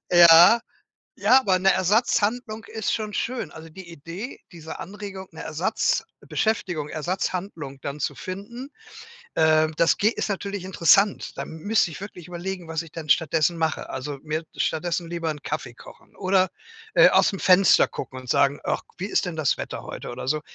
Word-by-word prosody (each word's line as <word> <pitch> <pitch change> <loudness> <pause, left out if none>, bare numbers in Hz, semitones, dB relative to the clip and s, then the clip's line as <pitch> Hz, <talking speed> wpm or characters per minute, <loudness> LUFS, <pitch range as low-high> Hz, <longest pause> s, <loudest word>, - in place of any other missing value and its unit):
Ja, 175 +6 +8 0.6
ja, 245 +6 +5
aber 190 -7 +2
'ne 190 +1 +4
Ersatzhandlung 220 +3 +1
ist 220 - -2
schon 215 -1 -3
schön, 240 -10 -3
also 160 0 -11
die 175 +1 -12
Idee, 170 - -8
diese 160 -1 -9
Anregung, 195 0 -8
'ne 160 - -9
Ersatzbeschäftigung 175 - -1
Ersatzhandlung 165 -4 -4
dann 140 +2 -5
zu - - -1
finden, 210 +8 -7 0.7
ähm, 155 0 +3
das 165 +1 +3
geht 215 +3 +2
ist - - -3
natürlich 200 -1 -4
interessant, 190 +2 +3
da - - -3
m 160 - -8
müsste 205 +1 +1
ich - - -9
wirklich 185 -4 -9
überlegen, 180 0 -6
was 160 0 -2
ich 165 - -14
denn 155 -3 -8
stattdessen 165 +1 +2
mache, 160 -1 -2
also 140 +2 -5
mir 155 +1 -3
stattdessen 170 +1 -1
lieber 170 -1 -3
'n 150 -1 -8
Kaffee 135 -5 -4
kochen - - -16
oder, 185 0 +2 0.5
äh, - - +7
aus'm 195 - +3
Fenster 185 +1 +5
gucken 130 - -7
und 130 -1 -12
sagen: 140 +3 +2
„Ach, - - -1
wie 185 - -4
ist - - +1
denn 180 -2 -4
das 155 -5 +1
Wetter - - -6
heute?“ - - -7
oder 125 +1 -7
so 155 +1 0
175 Hz, 170 wpm, -24 LUFS, 155-200 Hz, 0.7 s, Ja